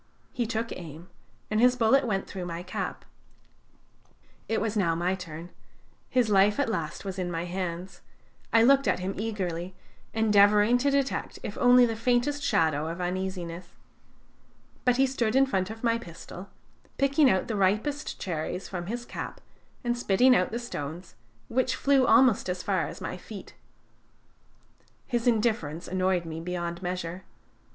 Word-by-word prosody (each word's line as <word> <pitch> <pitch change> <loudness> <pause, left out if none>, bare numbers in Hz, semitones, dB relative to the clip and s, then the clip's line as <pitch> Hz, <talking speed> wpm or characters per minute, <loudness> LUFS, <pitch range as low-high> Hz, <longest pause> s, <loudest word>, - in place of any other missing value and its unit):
He 240 -2 -1
took 230 0 -2
aim, 170 +1 -9 0.4
and 215 - +2
his 250 +2 +5
bullet 250 +3 +3
went 195 -3 -1
through 185 -3 -6
my 170 0 -5
cap. 180 - -5 1.4
It 225 - +1
was 220 0 -2
now 170 -6 +2
my 175 +2 0
turn. 175 -2 -7 0.6
His 250 -3 +2
life 205 +3 +4
at 285 - +1
last 170 -4 -3
was 190 -1 -4
in 180 -1 -2
my 170 0 -3
hands; 180 0 -5 0.5
I 225 0 +5
looked 275 +2 +5
at - - +2
him 185 +2 -3
eagerly, 185 -4 -3 0.4
endeavoring 210 +1 +4
to 280 +3 +2
detect 275 -1 -1
if 205 - -5
only 245 0 +7
the 225 -1 -2
faintest 245 +5 +1
shadow 160 - +1
of 165 +2 -5
uneasiness. 180 -1 -4 1.1
But 250 -1 +3
he 270 - +5
stood 250 -4 -1
in 270 0 +6
front 190 -7 -1
of 225 +1 -9
my 230 -1 +2
pistol, 180 0 -10 0.5
picking 275 +1 +4
out 190 -4 +1
the 225 - -2
ripest 215 +10 0
cherries 175 +1 -3
from 175 -2 -5
his 240 +3 -4
cap - - -6 0.4
and 240 -1 0
spitting 245 +2 +4
out 180 - +2
the 230 - -2
stones, 170 -7 -6 0.3
which 255 +2 0
flew 275 -2 +3
almost 250 -8 +5
as 180 0 -3
far - - 0
as - - -9
my - - -4
feet. - - -10 1.5
His 240 -1 -1
indifference 215 -9 0
annoyed 185 -1 0
me 160 0 -5
beyond 170 0 -4
measure. 180 0 -4
200 Hz, 160 wpm, -27 LUFS, 180-240 Hz, 1.5 s, only